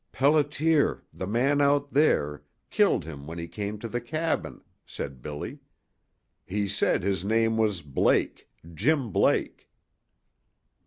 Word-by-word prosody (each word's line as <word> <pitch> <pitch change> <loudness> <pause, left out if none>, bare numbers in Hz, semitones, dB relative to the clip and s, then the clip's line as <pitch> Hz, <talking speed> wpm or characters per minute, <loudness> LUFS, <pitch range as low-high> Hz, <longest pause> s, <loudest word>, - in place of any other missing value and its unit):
"Pelliter 150 +2 +2
the 95 - -5
man 135 +7 +2
out 140 0 +2
there 75 - +2 0.3
killed - - +2
him 70 -3 -9
when 80 +1 -7
he 85 0 -5
came 100 +4 -5
to 115 - -6
the 120 +2 -3
cabin," 155 +7 -3 0.2
said 70 -3 -7
Billy. 75 +2 -6 0.8
"He 100 +2 -2
said 100 -3 +1
his 95 -2 0
name 115 +2 +2
was 105 -6 0
Blake 70 -2 0 0.2
Jim 135 - +1
Blake." - - +1
110 Hz, 125 wpm, -27 LUFS, -, 0.8 s, Pelliter